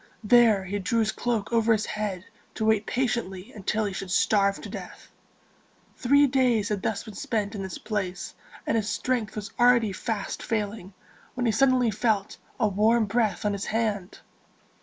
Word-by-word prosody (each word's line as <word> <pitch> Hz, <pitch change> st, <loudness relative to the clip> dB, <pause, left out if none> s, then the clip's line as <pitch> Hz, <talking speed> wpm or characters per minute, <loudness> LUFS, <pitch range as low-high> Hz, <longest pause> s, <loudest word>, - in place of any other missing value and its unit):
There 225 Hz, -3 st, +5 dB
he 200 Hz, +2 st, -3 dB
drew 215 Hz, +5 st, -1 dB
his 220 Hz, -, +1 dB
cloak 235 Hz, -2 st, -2 dB
over 230 Hz, 0 st, +3 dB
his 215 Hz, -1 st, +2 dB
head 205 Hz, -4 st, -4 dB, 0.3 s
to 220 Hz, -, -1 dB
wait 220 Hz, -1 st, +2 dB
patiently 220 Hz, -7 st, -2 dB
until 215 Hz, +1 st, -1 dB
he 200 Hz, -, -3 dB
should 190 Hz, 0 st, -5 dB
starve 200 Hz, +1 st, +2 dB
to -, -, -7 dB
death. -, -, -9 dB, 0.8 s
Three 280 Hz, +3 st, +4 dB
days 250 Hz, -6 st, +2 dB
had 205 Hz, -2 st, -1 dB
thus 200 Hz, 0 st, -2 dB
been 215 Hz, -, -10 dB
spent 210 Hz, -1 st, -2 dB
in 205 Hz, -, -5 dB
this 190 Hz, -3 st, -5 dB
place, 195 Hz, -4 st, -4 dB, 0.3 s
and -, -, 0 dB
his 215 Hz, -1 st, -1 dB
strength 245 Hz, -4 st, -1 dB
was 205 Hz, -2 st, -6 dB
already 240 Hz, -4 st, +4 dB
fast 210 Hz, +1 st, -4 dB
failing, 205 Hz, -4 st, -3 dB, 0.4 s
when 250 Hz, -1 st, -1 dB
he 230 Hz, -, +3 dB
suddenly 255 Hz, 0 st, +3 dB
felt 210 Hz, -1 st, 0 dB, 0.2 s
a 220 Hz, -, +3 dB
warm 215 Hz, +3 st, +3 dB
breath 215 Hz, -1 st, 0 dB
on 205 Hz, -, +1 dB
his 200 Hz, -1 st, -4 dB
hand. 215 Hz, -4 st, -2 dB
215 Hz, 175 wpm, -26 LUFS, 200-235 Hz, 0.8 s, There